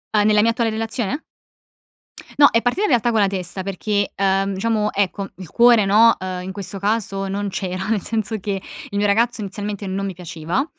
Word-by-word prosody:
Uhm, 210 -1 +4
nella 210 0 +4
mia 230 - +3
attuale 230 -1 0
relazione? 225 +5 -3 1.2
No, 285 - +9
è 230 - +3
partita 245 +12 0
in - - +2
realtà 240 -3 +2
con 225 - +2
la 200 - +4
testa 190 -1 -3
perché, 200 +1 -1
uhm, 195 0 +1
diciamo, 215 +1 0
ecco, 195 0 -1
il 185 -4 -10
cuore, 235 -3 +5
no, 225 +3 +6
uhm, 185 -1 -4
in 190 - -5
questo 195 0 -5
caso 200 -1 -1
non 200 +1 -2
c'era, 185 0 -4
nel 220 -3 +1
senso 220 +1 -2
che 195 -1 -3 0.3
il 200 - -4
mio 205 - +2
ragazzo 225 +3 +2
inizialmente 205 +1 -4
non 195 +1 -2
mi 195 - -4
piaceva. 175 - -3
205 Hz, 200 wpm, -21 LUFS, 195-225 Hz, 1.2 s, No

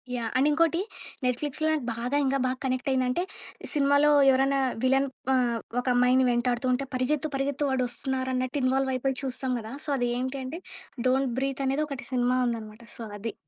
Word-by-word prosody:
Yeah! 230 -2 -2
And 270 +3 +4
ఇంకోటి, 330 +2 +2 0.5
‌నెట్‌ఫ్లిక్స్‌లో 285 +5 -1
నాకు 305 -5 -1
బాగా 245 +4 -1
ఇంక 270 +1 +1
బాగా 255 0 -1
కనెక్ట్ 255 +1 -1
అయిందంటే, 255 +5 +1 0.5
సినిమాలో 285 0 +4 0.2
ఎవరైనా 270 +1 +3 0.2
విలన్ 270 +1 +3 0.3
ఆహ్, 245 -2 +2 0.2
ఒక 245 - -4
అమ్మాయిని 250 +1 +4
వెంటాడుతూంటే 250 +2 +1
పరిగెత్తు 275 +4 0
పరిగెత్తు 280 +1 0
వాడొస్తున్నారన్నట్టు 260 +1 -1
ఇన్‌వాల్వ్ 265 +1 +2
అయిపోయి 265 +1 -1
చూస్తాం 260 -1 -2
కదా! 220 +1 -8
సో, - - -5
అది 245 -1 0
ఏంటి 260 +2 -3
అంటే 280 +7 -5 0.5
'డోంట్ 265 0 +2
బ్రీత్' 275 0 -2
అనేది 275 +3 +1
ఒకటి 275 -3 -6
సినిమా 250 0 +2
ఉందన్నమాట. 220 -1 -5
సో, 235 - -7
అది. 215 +1 -4
260 Hz, 160 wpm, -27 LUFS, 250-275 Hz, 0.5 s, And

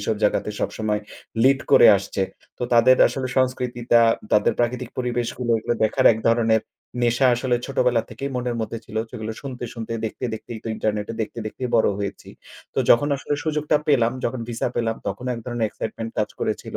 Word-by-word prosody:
এসব 105 +2 0
জায়গাতে 105 0 +1
সবসময় 105 -1 -1 0.4
লিড 135 +2 +5
করে - - +8
আসছে। 100 0 -3 0.4
তো - - -5
তাদের 120 +2 +6
আসলে 130 -2 -3
সংস্কৃতিটা, 125 -2 +2 0.3
তাদের 105 -1 +4
প্রাকৃতিক 120 +1 -1
পরিবেশগুলো 120 0 -2
এগুলো 115 +2 -1
দেখার 110 - +2
এক 110 - -4
ধরনের 115 -1 +3 0.4
নেশা 120 +2 +3
আসলে 125 0 0
ছোটবেলা 125 -4 +1
থেকেই 135 +5 -5
মনের 125 -1 -2
মধ্যে 110 +1 -4
ছিল। 110 -1 -10
সেগুলো 110 -2 -5
শুনতে, 130 -3 -6
শুনতেই, 115 -1 -4
দেখতে 110 - -6
দেখতেই 110 +1 -8
তো - - -3
ইন্টারনেটে 105 0 -2
দেখতে, 110 +2 -4
দেখতেই 125 +4 -4
বড় 110 - +4
হয়েছি। 100 -1 -5 0.5
তো - - -2
যখন 130 +5 +5
আসলে 140 - -2
সুযোগটা 150 -1 +1
পেলাম, 120 -5 +3
যখন 120 +1 -2
ভিসা 120 +1 -1
পেলাম 115 -1 0
তখন 100 +5 -4
এক - - -6
ধরনের 120 -2 -1
excitement 115 0 -5
কাজ 105 - +1
করেছিল। - - -3
120 Hz, 175 wpm, -23 LUFS, 110-125 Hz, 0.5 s, করে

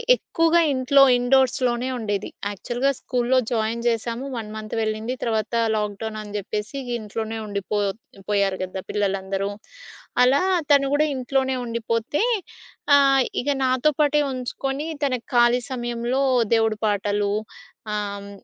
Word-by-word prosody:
ఎక్కువగా 330 -6 +2
ఇంట్లో 270 +1 +5 0.2
ఇండోర్స్‌లోనే 250 -1 +2
ఉండేది. 205 -3 -2 0.2
యాక్చువల్‌గా 240 +6 -1
స్కూల్లో 250 0 0
జాయిన్ 225 0 0
జేశాము. 235 +2 -1
1 225 -3 -5
మంత్ 215 0 -7
వెళ్ళింది. 220 +2 -2
తర్వాత 220 -1 -1 0.2
లాక్‌డౌనని 210 0 -4
చెప్పేసి 210 +5 -4 0.2
ఇంట్లోనే 220 +1 -4
ఉండిపో 200 0 -3 0.5
పోయారు 200 -2 +1
కదా! 185 +1 -5
పిల్లలందరూ. 195 -1 -1 0.7
అలా 260 +3 +4 0.3
తను 280 -1 +5
కూడా 300 +1 +3
ఇంట్లోనే 265 +1 0
ఉండిపోతే 230 +3 -1 0.7
ఆహ్, 275 -1 +5 0.2
ఇక 275 - -3 0.2
నాతోపాటే 295 +3 +2
ఉంచుకొని, 270 +3 -3 0.2
తన 265 -2 +1 0.2
ఖాళీ 240 +1 +5
సమయంలో 240 +1 -1 0.3
దేవుడి 225 -1 +2
పాటలు 205 0 0 0.6
ఆహ్, 200 -1 -4
235 Hz, 110 wpm, -23 LUFS, 210-260 Hz, 0.7 s, ఇంట్లో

